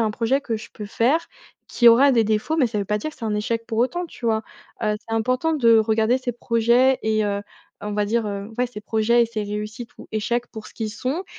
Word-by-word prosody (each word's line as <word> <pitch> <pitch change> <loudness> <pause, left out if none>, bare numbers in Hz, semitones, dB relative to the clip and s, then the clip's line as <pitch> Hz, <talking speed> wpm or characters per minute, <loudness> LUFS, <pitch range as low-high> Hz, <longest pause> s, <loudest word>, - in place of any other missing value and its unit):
a - - +2
un - - 0
projet 235 +5 0
que 230 -5 -2
je - - -11
peux 210 - -8
faire, 260 +10 +1 0.4
qui 240 - +5
aura 260 +4 +6
des 230 -2 +3
défauts 215 +9 0
mais 270 - +4
ça 225 -2 -5
veut 200 - -1
pas 210 +2 -1
dire 210 - -4
que - - -19
c'est 230 - -6
un 215 - -1
échec 225 +2 -2
pour 225 -2 -3
autant, 350 +10 0
tu 250 -6 -8
vois? 220 -1 +1 0.4
Heu, 210 -1 +1
c'est 225 - -2
important 255 +8 0
de 230 -6 +5
regarder 220 +3 +2
ses 255 -1 -3
projets 240 +3 +2
et 215 -1 +1
heu, 200 -1 -1 0.4
on 210 - -5
va 210 0 +1
dire, 225 +1 0
heu, 200 +1 -5
ouais, 250 - +2
ses 210 -4 -10
projets 225 +3 +2
et - - +1
ses 220 -2 -4
réussites 210 +3 -6
ou - - -12
échecs 235 +3 -1
pour 220 -1 -9
ce - - -15
qu'ils 220 -2 -3
sont, 260 - -3
230 Hz, 260 wpm, -22 LUFS, 215-245 Hz, 0.4 s, aura